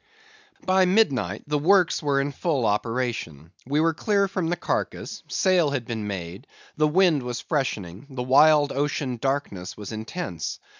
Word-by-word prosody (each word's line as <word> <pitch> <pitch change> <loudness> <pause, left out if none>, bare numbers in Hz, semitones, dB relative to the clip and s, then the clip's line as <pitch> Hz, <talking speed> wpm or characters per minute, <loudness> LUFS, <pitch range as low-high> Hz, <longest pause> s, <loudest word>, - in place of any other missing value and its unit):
By 185 0 +4
midnight 140 - +1
the 150 0 0
works 180 +3 +3
were 140 -2 +1
in 140 +1 -1
full 140 -4 -1
operation. 105 - -2 0.2
We 145 +3 +1
were 165 +1 +3
clear 200 +4 +1
from 185 -3 -2
the 175 - +1
carcase; - - -3
sail 185 -6 +2
had 135 -4 -3
been 110 -3 -4
made; 95 +3 -6 0.3
the 155 0 +3
wind 165 -2 +3
was 125 -1 -4
freshening; 110 - -3
the 130 -2 -4
wild 145 +3 +5
ocean 140 -2 -2
darkness 135 -8 -3
was 105 -1 -7
intense. 110 - -5
140 Hz, 155 wpm, -25 LUFS, 110-160 Hz, 0.3 s, wild